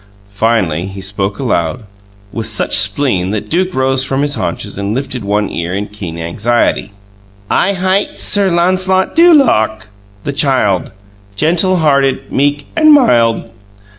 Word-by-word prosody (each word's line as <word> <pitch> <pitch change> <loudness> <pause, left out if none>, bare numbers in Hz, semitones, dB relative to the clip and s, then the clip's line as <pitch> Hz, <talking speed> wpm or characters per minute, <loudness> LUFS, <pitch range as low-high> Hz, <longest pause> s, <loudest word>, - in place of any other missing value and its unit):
Finally 100 -6 0
he 95 0 -9
spoke 95 +1 -3
aloud, 120 -3 -2 0.5
with 115 -1 -3
such 105 -2 0
spleen 100 -2 +1
that 105 0 -4
Duke 180 +2 0
rose 130 0 +1
from 135 +1 -1
his 145 0 0
haunches 100 -1 -4
and 100 +2 -2
lifted 130 -3 -4
one 105 +1 0
ear 85 +2 -3
in 100 +1 -2
keen 100 -6 -8
anxiety. 105 +5 -1 0.6
"'I 200 - +2
hight 190 +1 -1
Sir 200 -2 +3
Lancelot 185 +2 +1
du 345 +2 +6
Lake, 110 - +3 0.4
the 140 - -3
Child, 130 - 0 0.4
Gentul 175 - +1
hearted, 140 -3 +1
meek, 145 +1 0
and 310 -1 +5
mild. 120 - +2
120 Hz, 140 wpm, -13 LUFS, 100-165 Hz, 0.6 s, du